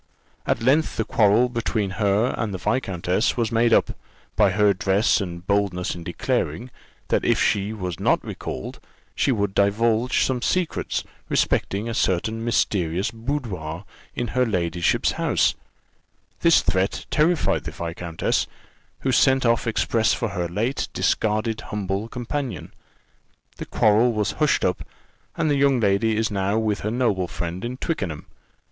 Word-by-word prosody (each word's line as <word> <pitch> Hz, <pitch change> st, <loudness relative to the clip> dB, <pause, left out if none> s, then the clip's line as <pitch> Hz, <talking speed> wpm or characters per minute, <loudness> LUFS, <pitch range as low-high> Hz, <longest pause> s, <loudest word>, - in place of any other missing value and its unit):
"At 115 Hz, -, 0 dB
length 145 Hz, +6 st, +2 dB
the -, -, 0 dB
quarrel 110 Hz, +3 st, +4 dB
between 115 Hz, -4 st, -2 dB
her 105 Hz, +4 st, +2 dB
and 110 Hz, -3 st, -2 dB
the 95 Hz, -, -3 dB
viscountess 95 Hz, -1 st, 0 dB
was 115 Hz, -2 st, 0 dB
made 115 Hz, +1 st, +3 dB
up, -, -, +4 dB, 0.4 s
by 100 Hz, -, +4 dB
her 105 Hz, +2 st, +3 dB
address 100 Hz, +2 st, +2 dB
and 85 Hz, -2 st, -6 dB
boldness 100 Hz, -3 st, 0 dB
in 85 Hz, -, -8 dB
declaring, 110 Hz, -, -2 dB, 0.4 s
that -, -, +1 dB
if -, -, +2 dB
she 100 Hz, +1 st, +1 dB
was 90 Hz, -6 st, -5 dB
not -, -, +1 dB
recalled, 65 Hz, -, -6 dB, 0.3 s
she 140 Hz, -, +1 dB
would 100 Hz, -5 st, 0 dB
divulge 110 Hz, +5 st, +2 dB
some 130 Hz, -2 st, -1 dB
secrets 185 Hz, +4 st, -1 dB, 0.3 s
respecting 100 Hz, +4 st, 0 dB
a 115 Hz, -, -3 dB
certain 110 Hz, +3 st, 0 dB
mysterious 95 Hz, -6 st, 0 dB
boudoir 110 Hz, -, -4 dB, 0.3 s
in 120 Hz, -, -2 dB
her 125 Hz, -, +1 dB
ladyship's 85 Hz, -6 st, +1 dB
house: -, -, +1 dB, 0.9 s
this 170 Hz, -1 st, +5 dB
threat 95 Hz, +2 st, 0 dB
terrified 160 Hz, +2 st, +2 dB
the -, -, -4 dB
viscountess, 85 Hz, 0 st, -2 dB, 0.5 s
who 135 Hz, -, 0 dB
sent 130 Hz, +1 st, +3 dB
off 115 Hz, 0 st, +2 dB
express 110 Hz, 0 st, +1 dB
for 115 Hz, -, -2 dB
her 90 Hz, -3 st, -2 dB
late 110 Hz, +10 st, -2 dB
discarded 110 Hz, +1 st, 0 dB
humble 100 Hz, 0 st, -2 dB
companion. 125 Hz, +2 st, -5 dB, 0.8 s
The -, -, -7 dB
quarrel 110 Hz, +3 st, +3 dB
was 105 Hz, -2 st, 0 dB
hushed 150 Hz, -2 st, +1 dB
up, 90 Hz, -, 0 dB, 0.6 s
and 160 Hz, -, +1 dB
the 145 Hz, -2 st, +2 dB
young 140 Hz, -2 st, +3 dB
lady 105 Hz, +1 st, +2 dB
is 110 Hz, -1 st, 0 dB
now 100 Hz, +1 st, 0 dB
with 110 Hz, -2 st, 0 dB
her 105 Hz, -, -2 dB
noble 110 Hz, -6 st, 0 dB
friend 85 Hz, +1 st, -5 dB
at 125 Hz, +2 st, -5 dB
Twickenham. 95 Hz, -, -3 dB
110 Hz, 150 wpm, -23 LUFS, 95-120 Hz, 0.9 s, this